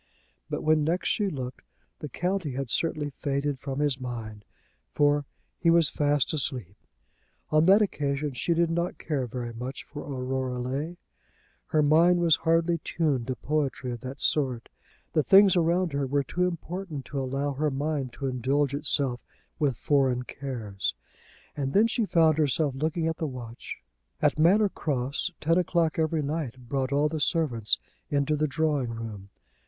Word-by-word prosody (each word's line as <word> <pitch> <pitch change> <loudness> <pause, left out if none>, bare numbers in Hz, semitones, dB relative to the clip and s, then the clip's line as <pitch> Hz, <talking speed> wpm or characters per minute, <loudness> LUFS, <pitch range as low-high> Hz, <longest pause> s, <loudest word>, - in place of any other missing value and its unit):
But - - -3
when 155 -1 +3
next 170 +4 0
she 205 -2 +1
looked, 130 -5 -6 0.4
the 150 - -6
county 180 -4 -2
had 135 -2 -4
certainly 150 -3 0
faded 140 -1 -2
from 135 0 -5
his 145 -3 +1
mind, 110 -5 -6 0.5
for 145 0 +3 0.3
he 170 - +3
was 165 -1 +4
fast 145 -3 +1
asleep. 125 - -2 0.8
On 155 +1 +4
that 200 +3 +7
occasion 145 -6 -1
she 170 +7 0
did 170 0 +2
not 170 +1 -1
care 140 -5 -2
very 120 0 -5
much 125 +4 -6
for 145 0 -8
Aurora 130 -2 -3
Leigh. 140 +8 -3 0.7
Her 155 -1 +2
mind 165 +4 +5
was 165 -2 +4
hardly 165 +1 +2
tuned 145 -7 -1
to 130 - -1
poetry 140 -1 -2
of 120 -2 -6
that 130 +2 -7
sort. 130 -6 0 0.4
The 155 - +4
things 195 +4 +6
around 170 -1 +2
her 140 -1 0
were 140 +1 +1
too 180 +7 0
important 170 -3 -5
to 140 -2 -3
allow 135 +2 -1
her 150 +3 0
mind 140 -1 -2
to 140 - -6
indulge 135 +2 0
itself 140 -4 0 0.4
with 140 -6 +1
foreign 130 -4 +2
cares. 115 - -4 0.6
And 135 -2 -2
then 210 +3 +5
she 230 0 +1
found 160 -4 +4
herself 145 -1 +2
looking 155 +4 -1
at 165 0 -1
the 160 - -2
watch. 120 -3 -7 0.4
At - - +2
Manor 200 +6 +5
Cross 140 0 -2
ten 165 +3 +3
o'clock 170 -2 +1
every 160 -1 +1
night 140 -5 -4
brought 135 0 -1
all 145 +2 +3
the 155 +1 -3
servants 125 - +2 0.3
into 145 +1 +1
the 155 +1 +1
drawing 150 -3 0
room. 110 -4 -7
145 Hz, 165 wpm, -27 LUFS, 130-160 Hz, 0.8 s, that